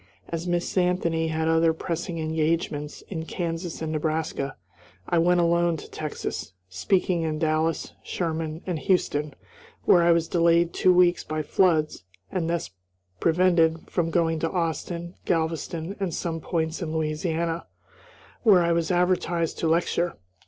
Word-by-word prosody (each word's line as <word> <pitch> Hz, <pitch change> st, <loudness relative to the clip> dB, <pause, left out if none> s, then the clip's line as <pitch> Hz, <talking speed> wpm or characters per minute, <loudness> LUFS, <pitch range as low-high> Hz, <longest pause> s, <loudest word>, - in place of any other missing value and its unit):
As 165 Hz, +1 st, -3 dB
Miss 175 Hz, +2 st, 0 dB
Anthony 170 Hz, -2 st, +1 dB
had 160 Hz, 0 st, -1 dB
other 165 Hz, 0 st, +4 dB
pressing 165 Hz, +1 st, -4 dB
engagements 155 Hz, -1 st, -1 dB
in 160 Hz, -4 st, -5 dB
Kansas 165 Hz, -1 st, -4 dB
and 155 Hz, -, -2 dB
Nebraska, 155 Hz, -3 st, -2 dB, 0.5 s
I 170 Hz, -, +2 dB
went 175 Hz, +1 st, +4 dB
alone 170 Hz, 0 st, +2 dB
to -, -, -9 dB
Texas, 150 Hz, -, -5 dB
speaking 175 Hz, -, +1 dB
in 155 Hz, -1 st, -1 dB
Dallas, 160 Hz, +1 st, 0 dB
Sherman, 160 Hz, -2 st, -3 dB
and 175 Hz, -4 st, -2 dB
Houston, 150 Hz, -6 st, 0 dB, 0.5 s
where 175 Hz, -, +6 dB
I 170 Hz, 0 st, +5 dB
was 165 Hz, -1 st, +2 dB
delayed 170 Hz, 0 st, +3 dB
two 185 Hz, -, +4 dB
weeks 180 Hz, -1 st, +4 dB
by 155 Hz, 0 st, -3 dB
floods 155 Hz, -, +2 dB, 0.3 s
and 170 Hz, -3 st, -1 dB
thus 170 Hz, -, -2 dB, 0.5 s
prevented 165 Hz, -1 st, +2 dB
from 170 Hz, -2 st, 0 dB
going 165 Hz, -1 st, +1 dB
to 165 Hz, -, 0 dB
Austin, 170 Hz, 0 st, -3 dB
Galveston, 165 Hz, +1 st, -1 dB
and 195 Hz, -3 st, -1 dB
some 165 Hz, -2 st, -3 dB
points 160 Hz, +1 st, -2 dB
in 160 Hz, -2 st, -3 dB
Louisiana, 165 Hz, +1 st, -1 dB, 0.7 s
where 195 Hz, -7 st, +6 dB
I 170 Hz, -, +2 dB
was 170 Hz, -1 st, +1 dB
advertised 175 Hz, -2 st, +1 dB
to 165 Hz, -, 0 dB
lecture. 170 Hz, +1 st, +1 dB
165 Hz, 145 wpm, -25 LUFS, 160-175 Hz, 0.7 s, where